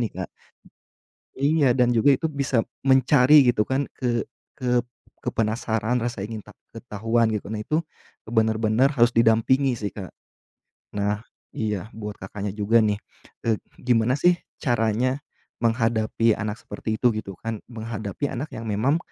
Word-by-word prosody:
nih, 115 -4 -1
Kak. - - -10 1.1
Iya 140 -1 +3
dan 125 -1 +3
juga 140 +5 +5
itu 160 +4 0
bisa 140 -5 0 0.2
mencari 130 +1 +6
gitu 110 -3 +3
kan 135 +3 -1
ke 120 -2 0 0.3
ke 125 -2 0 0.4
ke 125 - -3
penasaran, 110 +1 0
rasa 120 -3 -3
ingin 110 -1 -6
ta - - -14 0.2
ketahuan, 115 0 0
gitu. 105 - -3
Nah, 105 0 -3
itu, 155 +7 0 0.5
ke - - -9
benar-benar 110 +3 +3
harus 120 -3 +3
didampingi 115 +4 +4
sih, 105 -2 -3
Kak. 95 -3 -7 0.8
Nah. 105 0 0 0.4
Iya 105 -3 -2
buat 105 -1 -7
Kakaknya 100 +1 -5
juga 105 +3 +3
nih, 105 -1 +1 0.5
eee, 110 -2 +1 0.2
gimana 125 +1 +2
sih 175 +4 +5 0.2
caranya, 120 +1 0 0.4
menghadapi 115 -1 +2
anak 105 0 -4
seperti 110 -1 -5
itu 120 -3 +3
gitu 100 -3 -6
kan? 115 -2 -5
Menghadapi 110 +1 -4
anak 140 +3 -5
yang 115 - -7
memang 110 +9 +1
115 Hz, 150 wpm, -24 LUFS, 110-125 Hz, 1.1 s, mencari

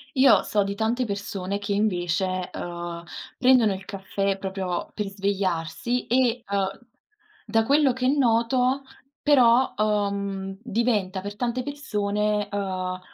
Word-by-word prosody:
Io, 265 -1 +6
so 205 -1 +1
di 200 0 -3
tante 225 +4 0
persone 200 -2 -3
che 205 0 -5
invece, 185 -2 0
uhm, 175 -1 -5 0.4
prendono 250 -5 +5
il 190 0 -8
caffè 195 0 -2
proprio 190 -2 -3
per 210 -2 -3
svegliarsi 195 +2 -1
e, 245 -1 +2
uhm, 195 -1 -1 0.7
da 225 0 +2
quello 280 0 +4
che 255 0 0
noto 255 0 +2 0.4
però, 255 -3 +5
uhm, 200 -2 -1
diventa 215 -5 0
per 205 +1 -7
tante 245 +1 -1
persone, 210 -7 -1
ehm, 185 -2 -3
205 Hz, 125 wpm, -25 LUFS, 195-240 Hz, 0.7 s, Io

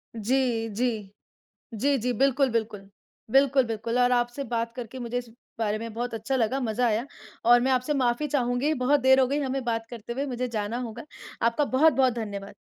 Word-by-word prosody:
जी, 230 0 0
जी। 215 -3 -2 0.6
जी, 275 +6 +1
जी, 250 +2 -1
बिल्कुल, 270 +2 +2
बिल्कुल। 215 -3 -3 0.4
बिल्कुल, 270 0 +4
बिल्कुल 230 +1 -2
और 245 0 +4
आपसे 240 +3 0
बात 230 -1 -2
करके 245 0 -7
मुझे 240 0 -3
इस 245 -1 -7 0.3
बारे 215 -1 0
में 230 0 -6
बहुत 240 0 -3
अच्छा 245 +5 -2
लगा, 255 +3 0
मज़ा 240 +1 0
आया 230 +4 0 0.4
और 240 +1 +6
मैं 260 +1 +1
आपसे 255 +4 +1
माफ़ी 255 +2 +1
चाहूँगी 260 +2 0
बहुत 275 +2 +2
देर 265 0 +5
हो 260 - +4
गई 285 +3 -1
हमें 270 -1 -2
बात 225 -1 -2
करते 235 0 -7
हुए 275 +3 -2
मुझे 250 -1 -3
जाना 220 +1 -3
होगा। 235 0 -6 0.4
आपका 235 +6 +2
बहुत-बहुत 265 -2 +3
धन्यवाद। 200 -3 -6
245 Hz, 190 wpm, -26 LUFS, 225-265 Hz, 0.6 s, और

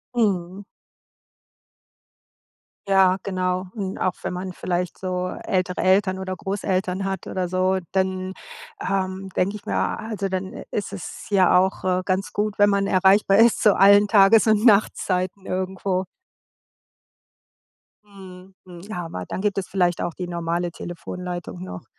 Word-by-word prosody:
Mhm. 195 -4 0 2.2
Ja, 190 -1 +4
genau. 185 -1 -1
Und 195 -4 -4
auch 185 - 0
wenn - - -4
man 185 +1 -5
vielleicht 180 0 -3
so 180 -1 -2
ältere 185 -1 -1
Eltern 190 0 +2
oder 185 0 -4
Großeltern 190 -1 -2
hat 195 -2 -3
oder 185 -1 -2
so, 185 +1 +1
dann, 190 0 -1 0.5
ähm, 190 0 -2
denke 195 +3 0
ich 210 - -10
mir - - -3
a - - 0
also 215 -3 -4
dann 190 0 -4 0.2
ist 205 -1 -3
es 195 - -8
ja 185 -3 +5
auch, 190 +1 +1
äh, 185 0 0
ganz 190 0 -1
gut, 210 0 -2
wenn 205 0 +6
man 200 0 +1
erreichbar 195 +1 +4
ist, 230 0 +4
zu 210 -3 +5
allen 200 +1 +6
Tages 205 +1 +6
und 215 0 +3
Nachtzeiten 195 -3 +2
irgendwo. 185 0 -2 2.0
Mhm, 190 -2 -14
mhm. 180 +3 -11
Aber 165 - -5
dann - - -4
gibt 205 -1 0
es 195 - -2
vielleicht 180 -3 +1
auch 175 - -2
die 180 +1 -6
normale 170 0 -2
Telefonleitung 175 - -7
noch. 90 -1 -8
190 Hz, 145 wpm, -23 LUFS, 180-195 Hz, 2.2 s, wenn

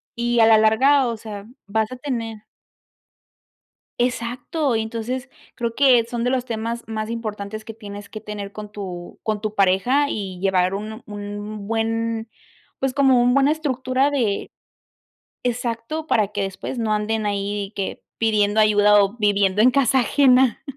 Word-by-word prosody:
y 240 0 0
a 225 - +7
la 220 -1 +7
larga, 260 +5 +4
o 230 -1 -3
sea, 205 -2 -8 0.2
vas 220 +3 0
a - - -5
tener 230 -5 -4 1.6
Exacto, 250 +3 -1
y 220 - 0
entonces 235 +4 -4 0.3
creo 235 -2 -2
que 255 -4 +5
son 235 -1 -3
de 245 - +1
los 255 -1 0
temas 230 0 -4
más 220 0 -4
importantes 215 -2 -5
que 225 - -8
tienes 205 -2 -9
que 215 - -8
tener 205 -1 -7
con 210 -1 -8
tu 180 -4 -7
con 215 -2 -1
tu 215 0 -4
pareja 200 +10 +3
y 190 -6 -4
llevar 185 0 +1
un 215 +3 -6
un 205 0 -6
buen, 225 0 -1 0.5
pues, 270 -1 -1
como 265 -3 +4
un 245 +1 +3
buena 275 +1 +4
estructura 270 -2 0
de 225 -8 -1 0.9
exacto, 245 +5 -2
para 215 -8 +2
que 205 - -1
después 195 +6 -5
no 220 -2 0
anden 215 +1 -1
ahí 200 0 -2
que 195 - -4
pidiendo 215 -1 +2
ayuda 210 -1 +5
o 200 +3 0
viviendo 200 -1 +2
en 250 +2 +6
casa 265 -1 +3
ajena. 255 0 +4
225 Hz, 160 wpm, -22 LUFS, 205-245 Hz, 1.6 s, a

